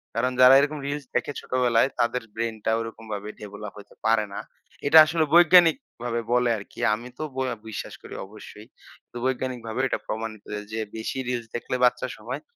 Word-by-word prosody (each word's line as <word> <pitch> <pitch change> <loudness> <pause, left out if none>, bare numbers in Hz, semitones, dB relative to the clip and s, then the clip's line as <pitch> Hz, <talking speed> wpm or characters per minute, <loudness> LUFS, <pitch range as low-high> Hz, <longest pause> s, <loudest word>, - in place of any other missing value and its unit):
কারণ 125 +2 +1
যারা 130 +1 +9
এরকম 150 +1 0
রিলস 145 0 -4
দেখে - - 0
ছোটবেলায় 125 -1 +2
তাদের 120 +1 +1
ব্রেইনটা 110 -1 -2
ওইরকমভাবে 110 -2 -6
ডেভেলপ 105 0 -8
হইতে 100 - -14
পারে 110 -1 +3
না। - - -4 0.5
এটা 160 - +7
আসলে 160 0 +1
বৈজ্ঞানিকভাবে 170 - +4
বলে 125 0 +3
আরকি। 100 - -12
আমি 115 +3 -5
তো 155 - -4
ব - - -11 0.3
বিশ্বাস 110 - -6
করি - - -10
অবশ্যই। 105 +1 -13 0.4
তো - - -25
বৈজ্ঞানিকভাবেও 130 -1 -2
এটা - - -1
প্রমাণিত 110 -1 -5 0.3
যে 110 - -3 0.2
বেশি 110 +3 -4
রিলস 120 -2 -2
দেখলে 120 - -3
বাচ্চা 125 - +1
সময়ে, - - -6
120 Hz, 165 wpm, -25 LUFS, 110-130 Hz, 0.5 s, যারা